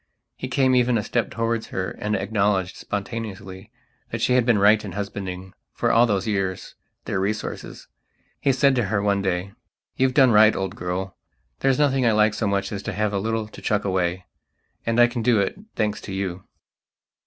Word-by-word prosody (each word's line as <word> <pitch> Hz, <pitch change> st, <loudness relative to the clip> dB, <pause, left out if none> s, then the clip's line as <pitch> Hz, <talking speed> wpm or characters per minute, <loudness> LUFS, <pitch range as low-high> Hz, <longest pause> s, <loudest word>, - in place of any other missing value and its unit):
He -, -, -5 dB
came 130 Hz, 0 st, +2 dB
even 125 Hz, -1 st, +3 dB
a 105 Hz, -, -1 dB
step 120 Hz, +2 st, -1 dB
towards 115 Hz, 0 st, -2 dB
her 95 Hz, 0 st, -3 dB
and 105 Hz, 0 st, -2 dB
acknowledged, 100 Hz, -2 st, 0 dB
spontaneously, 100 Hz, -2 st, -6 dB, 0.4 s
that -, -, -4 dB
she 125 Hz, -, +2 dB
had 125 Hz, -1 st, +3 dB
been 120 Hz, -3 st, +4 dB
right 105 Hz, +2 st, +5 dB
in 100 Hz, -4 st, -7 dB
husbanding, 95 Hz, -2 st, -5 dB, 0.2 s
for -, -, 0 dB
all 120 Hz, +2 st, +5 dB
those 100 Hz, -4 st, 0 dB
years, 95 Hz, -4 st, -2 dB, 0.3 s
their -, -, -1 dB
resources. 105 Hz, +3 st, -4 dB, 0.5 s
He 140 Hz, -, +2 dB
said 135 Hz, +1 st, +3 dB
to 120 Hz, -, +2 dB
her 100 Hz, +1 st, 0 dB
one 100 Hz, 0 st, +1 dB
day: 95 Hz, 0 st, -2 dB, 0.5 s
"You've 130 Hz, 0 st, +2 dB
done 130 Hz, -4 st, +6 dB
right, 110 Hz, 0 st, +6 dB
old 95 Hz, +1 st, -3 dB
girl. 90 Hz, 0 st, -4 dB, 0.4 s
There's 135 Hz, -1 st, +2 dB
nothing 135 Hz, -3 st, +2 dB
I 115 Hz, -, +4 dB
like 105 Hz, 0 st, +3 dB
so 110 Hz, 0 st, -1 dB
much 100 Hz, 0 st, -1 dB
as 100 Hz, -2 st, -4 dB
to 110 Hz, -, -5 dB
have 105 Hz, +1 st, -1 dB
a 100 Hz, -, 0 dB
little 110 Hz, +1 st, -2 dB
to -, -, -12 dB
chuck 105 Hz, -1 st, 0 dB
away. 90 Hz, -1 st, -1 dB, 0.6 s
And 115 Hz, +1 st, +1 dB
I 120 Hz, -, +8 dB
can 120 Hz, 0 st, -3 dB
do 115 Hz, -2 st, +3 dB
it, 100 Hz, -, 0 dB, 0.2 s
thanks 105 Hz, -1 st, -1 dB
to 100 Hz, -, -7 dB
you." 95 Hz, -2 st, -4 dB
105 Hz, 195 wpm, -23 LUFS, 95-115 Hz, 0.6 s, I